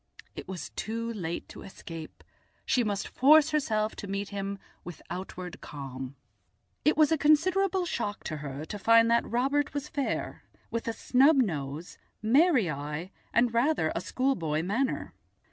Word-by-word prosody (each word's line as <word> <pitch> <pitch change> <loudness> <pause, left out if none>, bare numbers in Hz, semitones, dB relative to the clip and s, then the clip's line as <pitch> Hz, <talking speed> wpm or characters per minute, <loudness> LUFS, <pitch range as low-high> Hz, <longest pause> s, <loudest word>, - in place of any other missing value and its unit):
It - - -8
was 185 -5 -6
too 230 +2 -3
late 175 -5 -4
to - - -10
escape; 165 -4 -9 0.4
she 250 - +2
must 205 -3 -2
force 305 +3 +5
herself 220 -8 0
to 200 - -6
meet 200 +1 -3
him 200 0 -4 0.3
with 175 - -8
outward 180 0 -6
calm. 135 -2 -7 0.7
It 305 - +3
was 310 -1 +5
a 320 - +2
considerable 370 +5 +3
shock 215 -10 -3
to 155 - -4
her 145 0 -6
to 205 +5 -6
find 230 +2 +5
that 235 - +2
Robert 275 +5 +1
was 285 - -2
fair, 285 -3 -3 0.3
with 230 0 -3
a 230 - 0
snub 270 +7 +4
nose, 160 - -2 0.2
merry 260 - +4
eye, 150 +4 -4 0.2
and 235 0 +3
rather 235 - +2
a 170 - -2
schoolboy 170 - 0
manner. 235 +9 -1
220 Hz, 155 wpm, -29 LUFS, 170-275 Hz, 0.7 s, force